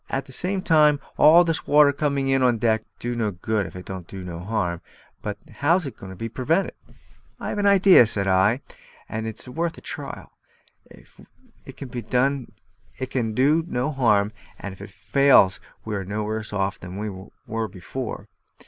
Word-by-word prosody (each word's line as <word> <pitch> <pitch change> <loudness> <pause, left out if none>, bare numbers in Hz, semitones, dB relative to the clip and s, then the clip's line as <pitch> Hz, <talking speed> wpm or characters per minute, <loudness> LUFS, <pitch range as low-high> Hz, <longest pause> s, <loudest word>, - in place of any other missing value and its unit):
At 135 0 -2
the 135 - -13
same 185 +6 -1
time, 150 -3 +4 0.2
all 165 +3 +7
this 165 -2 -2
water 145 -1 +6
coming 140 -1 -1
in 135 0 +2
on 125 -2 +3
deck 110 0 +1
don't - - -40
do 120 0 -3
no 115 -2 0
good 100 +2 -2
if - - -12
it 90 0 -8
don't 95 -3 -7
do 95 -1 -8
no 85 -2 -6
harm; 90 -3 -2 0.4
but 105 -1 -4 0.2
how's 165 +4 +2
it 130 -5 -6
to 95 -1 -9
be 115 +5 -4
pervented?" 145 - 0 0.7
"I - - -4
have - - -3
an 200 - +2
idea," 195 - +7
said 100 -2 -1
I, 95 +7 +3 0.5
"and 110 +1 -4
it's 110 +3 -5
worth 165 +6 -3
a - - -11
trial. - - -7 0.6
It 225 - -18
can 135 - -8 1.5
do 150 +6 +3
no 125 +2 -1
harm, 110 -7 +2 0.3
and 100 - -6
if 95 - -14
it 100 - -8
fails 100 -3 +4 0.3
we 110 -1 -3
are 100 - -3
no 105 +3 -3
worse 110 +1 -4
off 100 -1 -1
than 90 +1 -8
we 100 -2 -6 0.2
were 115 0 -2
before." 105 +6 -6
115 Hz, 180 wpm, -24 LUFS, 100-145 Hz, 1.5 s, all